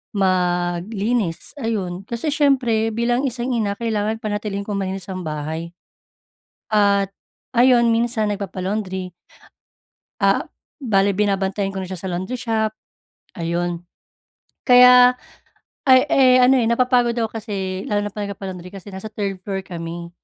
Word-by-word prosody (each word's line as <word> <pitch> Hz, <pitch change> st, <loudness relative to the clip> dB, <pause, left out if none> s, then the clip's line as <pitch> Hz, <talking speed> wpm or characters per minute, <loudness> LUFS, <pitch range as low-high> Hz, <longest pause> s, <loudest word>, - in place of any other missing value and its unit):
maglinis 185 Hz, +2 st, 0 dB
ayun 195 Hz, -5 st, -3 dB
kasi 240 Hz, +6 st, -2 dB
siyempre 250 Hz, -7 st, +2 dB
bilang 240 Hz, +3 st, +1 dB
isang 245 Hz, 0 st, -3 dB
ina 215 Hz, -4 st, 0 dB
kailangan 220 Hz, -1 st, -1 dB
panatilihin 205 Hz, -1 st, -3 dB
kong 200 Hz, -1 st, -3 dB
malinis 190 Hz, -1 st, -4 dB
ang 185 Hz, -3 st, -5 dB
bahay, 160 Hz, +3 st, -5 dB, 0.9 s
at, 200 Hz, -2 st, +3 dB, 0.5 s
ayon 240 Hz, -1 st, +5 dB
minsan 230 Hz, -1 st, +1 dB
nagpapa-laundry. 190 Hz, -2 st, -3 dB, 1.1 s
Ah, -, -, +3 dB, 0.4 s
bale 200 Hz, -5 st, +2 dB
binabantayan 195 Hz, 0 st, 0 dB
ko 195 Hz, -, -6 dB
na 190 Hz, -, -4 dB
siya 185 Hz, -, -6 dB
sa 190 Hz, -, -4 dB
laundry 185 Hz, +8 st, -3 dB
shop, 220 Hz, -3 st, -1 dB, 0.6 s
ayun. 175 Hz, +1 st, -2 dB, 0.8 s
Kaya 250 Hz, 0 st, +7 dB, 0.7 s
ay, 260 Hz, 0 st, +8 dB
eh, 255 Hz, -2 st, +5 dB
ano, 260 Hz, +2 st, +5 dB
eh, 230 Hz, -, +1 dB
napapagod 245 Hz, 0 st, +2 dB
ako 225 Hz, -2 st, 0 dB
kasi 195 Hz, -3 st, -4 dB
lalo 205 Hz, -1 st, 0 dB
na 205 Hz, -, -8 dB
pag 210 Hz, 0 st, -4 dB
nagpapa-laundry 185 Hz, -2 st, -7 dB
kasi 195 Hz, +1 st, -10 dB
nasa 190 Hz, +3 st, -8 dB
3rd 200 Hz, -3 st, -3 dB
floor 195 Hz, -1 st, -3 dB
kami, 170 Hz, -1 st, -7 dB
205 Hz, 130 wpm, -21 LUFS, 185-235 Hz, 1.1 s, ay